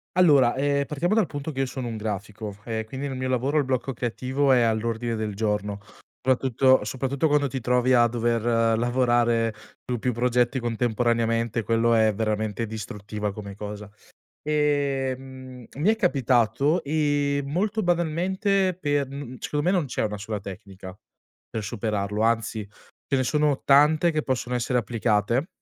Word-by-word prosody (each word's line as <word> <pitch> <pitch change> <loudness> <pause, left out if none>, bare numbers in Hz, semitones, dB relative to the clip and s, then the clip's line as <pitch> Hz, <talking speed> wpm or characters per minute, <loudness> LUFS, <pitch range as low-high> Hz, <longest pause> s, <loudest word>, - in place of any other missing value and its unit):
Allora, 145 -9 +5
ehm, 140 +1 +1
partiamo 170 +9 0
dal 220 - +3
punto 145 0 -5
che 135 - -6
io 135 - +1
sono 130 -1 -5
un 115 -2 -4
grafico, 105 0 -5
e 110 -1 -3
quindi 135 +4 -5
nel 135 -2 -5
mio 130 0 -2
lavoro 130 +4 0
il 145 - +3
blocco 130 0 -2
creativo 130 +4 0
è 125 -2 +5
all'ordine 115 +1 0
del 110 -1 -3
giorno, 105 -1 -2 0.4
soprattutto 130 -1 +3
soprattutto 135 +6 -1
quando 145 -1 +2
ti 130 0 -4
trovi 125 +1 +2
a 120 -1 +6
dover 115 -1 +1
lavorare 120 -2 +2 0.3
su 125 - 0
più 125 +2 -1
progetti 125 +2 +1
contemporaneamente, 115 -1 0
quello 115 +1 +2
è 110 -1 +4
veramente 110 +1 -2
distruttiva 105 -1 -5
come 100 -1 -8
cosa. 105 0 -7 0.5
Ehm, 135 -4 -2
mi 150 +9 +1
è 220 - +4
capitato, 135 - +2
ehm, 145 -1 0
molto 210 +6 0
banalmente 185 +3 +1
per, 145 -5 -1
mhmm, 140 -2 -7
secondo 150 0 -2
me 180 - +3
non 180 -5 +1
c'è 130 - -2
una 105 -1 -3
sola 105 +1 -4
tecnica 95 -1 -10 0.5
per 110 - -4
superarlo 105 -1 -2
anzi, 110 -1 0 0.4
ce 140 - +1
ne 130 - +1
sono 150 +1 +1
tante 150 +4 +5
che 155 -1 -1
possono 125 -1 -2
essere 125 +1 +1
applicate 115 - 0
125 Hz, 155 wpm, -25 LUFS, 110-140 Hz, 0.5 s, a